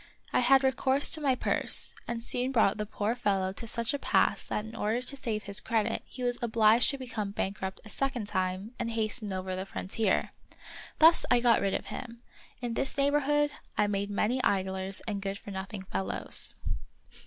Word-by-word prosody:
I -, -, +4 dB
had 265 Hz, +2 st, +5 dB
recourse 265 Hz, +1 st, +3 dB
to 315 Hz, -, +2 dB
my 270 Hz, -3 st, +3 dB
purse, -, -, +2 dB
and 235 Hz, -1 st, -3 dB
soon 250 Hz, +2 st, 0 dB
brought 220 Hz, -5 st, +3 dB
the 210 Hz, -, -2 dB
poor 210 Hz, +1 st, -1 dB
fellow 195 Hz, -6 st, 0 dB
to 230 Hz, +3 st, -8 dB
such 235 Hz, +1 st, -1 dB
a 285 Hz, -, -2 dB
pass -, -, +2 dB
that 210 Hz, -, -3 dB
in 220 Hz, +1 st, -9 dB
order 220 Hz, +2 st, 0 dB
to 265 Hz, +2 st, -4 dB
save 220 Hz, -5 st, -3 dB
his 200 Hz, 0 st, 0 dB
credit 225 Hz, -2 st, 0 dB
he 255 Hz, -, -7 dB
was 245 Hz, 0 st, 0 dB
obliged 225 Hz, 0 st, +4 dB
to 275 Hz, -, -1 dB
become 230 Hz, -6 st, -4 dB
bankrupt 190 Hz, -1 st, -3 dB
a -, -, -10 dB
second 260 Hz, -1 st, -2 dB
time 185 Hz, +3 st, -2 dB
and 230 Hz, -, -1 dB
hasten 220 Hz, -1 st, -1 dB
over 185 Hz, 0 st, -3 dB
the 190 Hz, +1 st, -4 dB
frontier. 195 Hz, +1 st, -1 dB, 0.7 s
Thus 325 Hz, +2 st, +6 dB
I 245 Hz, -, +5 dB
got 240 Hz, -1 st, +4 dB
rid 195 Hz, -1 st, +1 dB
of -, -, -3 dB
him. 235 Hz, -1 st, -8 dB, 0.4 s
In 240 Hz, -1 st, -2 dB
this 270 Hz, +4 st, -1 dB
neighborhood 290 Hz, +1 st, +2 dB, 0.3 s
I 210 Hz, -, +4 dB
made 200 Hz, 0 st, -1 dB
many 225 Hz, +5 st, 0 dB
idlers 190 Hz, -1 st, 0 dB
and 205 Hz, -2 st, -2 dB
good 195 Hz, 0 st, -3 dB
for 200 Hz, -, -10 dB
nothing 190 Hz, +1 st, -6 dB
fellows. 95 Hz, -, -1 dB
220 Hz, 190 wpm, -29 LUFS, 200-250 Hz, 0.7 s, Thus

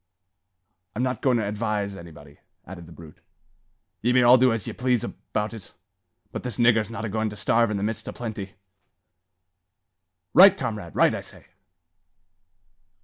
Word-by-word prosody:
"I'm 120 Hz, -, -1 dB
not 130 Hz, 0 st, -2 dB
goin' 130 Hz, -3 st, +2 dB
to 110 Hz, -, -1 dB
advise 105 Hz, -1 st, -3 dB
anybody," 75 Hz, -5 st, -13 dB, 0.3 s
added 85 Hz, -2 st, -10 dB
the -, -, -14 dB
brute. 80 Hz, -2 st, -14 dB, 0.8 s
"Ye 120 Hz, +2 st, +1 dB
may 125 Hz, -1 st, +4 dB
all 120 Hz, +1 st, +7 dB
do 130 Hz, -1 st, +4 dB
as 115 Hz, -4 st, -2 dB
ye -, -, -5 dB
please 125 Hz, -2 st, 0 dB
about 105 Hz, +2 st, -4 dB
it; 110 Hz, -5 st, -11 dB, 0.6 s
but -, -, -5 dB
this 125 Hz, -4 st, -5 dB
niggur's 115 Hz, -2 st, +3 dB
not 115 Hz, -1 st, -5 dB
a -, -, -2 dB
goin' 110 Hz, +1 st, -1 dB
to 105 Hz, -, -10 dB
starve 115 Hz, +1 st, +2 dB
in 105 Hz, -, -2 dB
the 100 Hz, -, -3 dB
midst 110 Hz, +1 st, -3 dB
o' -, -, -4 dB
plenty." 105 Hz, -4 st, -7 dB, 1.8 s
"Right, 195 Hz, +1 st, +8 dB
comrade! 105 Hz, -, -5 dB
right, -, -, +4 dB
I -, -, -4 dB
say." -, -, -13 dB
110 Hz, 165 wpm, -24 LUFS, 100-120 Hz, 1.8 s, Right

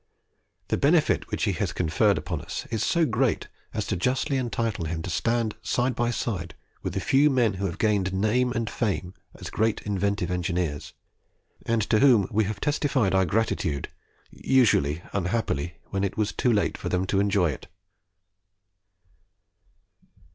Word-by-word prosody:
The -, -, +1 dB
benefit -, -, +3 dB
which -, -, -2 dB
he -, -, +2 dB
has -, -, -2 dB
conferred 90 Hz, +5 st, +2 dB
upon 80 Hz, -6 st, -4 dB
us 95 Hz, -, -5 dB
is 110 Hz, -2 st, 0 dB
so 170 Hz, +5 st, +2 dB
great 125 Hz, -2 st, 0 dB, 0.2 s
as -, -, -3 dB
to -, -, -1 dB
justly 130 Hz, -, 0 dB
entitle 115 Hz, -7 st, -2 dB
him 80 Hz, 0 st, -3 dB
to 90 Hz, -, -4 dB
stand 115 Hz, +7 st, 0 dB
side 125 Hz, +1 st, 0 dB
by 120 Hz, 0 st, 0 dB
side 100 Hz, -7 st, -3 dB, 0.3 s
with -, -, -4 dB
the -, -, +1 dB
few 140 Hz, +3 st, +4 dB
men 120 Hz, -6 st, +2 dB
who 100 Hz, +1 st, -2 dB
have 85 Hz, -, -5 dB
gained 100 Hz, -4 st, +1 dB
name 110 Hz, +6 st, +1 dB
and 115 Hz, -2 st, -2 dB
fame 100 Hz, -5 st, -2 dB, 0.2 s
as -, -, -8 dB
great 110 Hz, 0 st, 0 dB
inventive 100 Hz, -2 st, -1 dB
engineers, 90 Hz, -4 st, -2 dB, 0.7 s
and 115 Hz, -2 st, +2 dB
to 110 Hz, -, +2 dB
whom 120 Hz, -7 st, +5 dB
we 110 Hz, +1 st, +2 dB
have 105 Hz, 0 st, -4 dB
testified 140 Hz, -8 st, +1 dB
our 95 Hz, 0 st, +4 dB
gratitude 85 Hz, -7 st, -1 dB, 0.4 s
usually, 85 Hz, -, +2 dB
unhappily, 90 Hz, -5 st, -1 dB, 0.2 s
when 100 Hz, 0 st, -1 dB
it 100 Hz, -, -2 dB
was 110 Hz, -1 st, +1 dB
too 125 Hz, -, +1 dB
late 105 Hz, -3 st, 0 dB
for -, -, -4 dB
them 90 Hz, +1 st, 0 dB
to 95 Hz, +1 st, +1 dB
enjoy 100 Hz, -5 st, +2 dB
it." 65 Hz, -, -9 dB
105 Hz, 160 wpm, -26 LUFS, 90-120 Hz, 0.7 s, whom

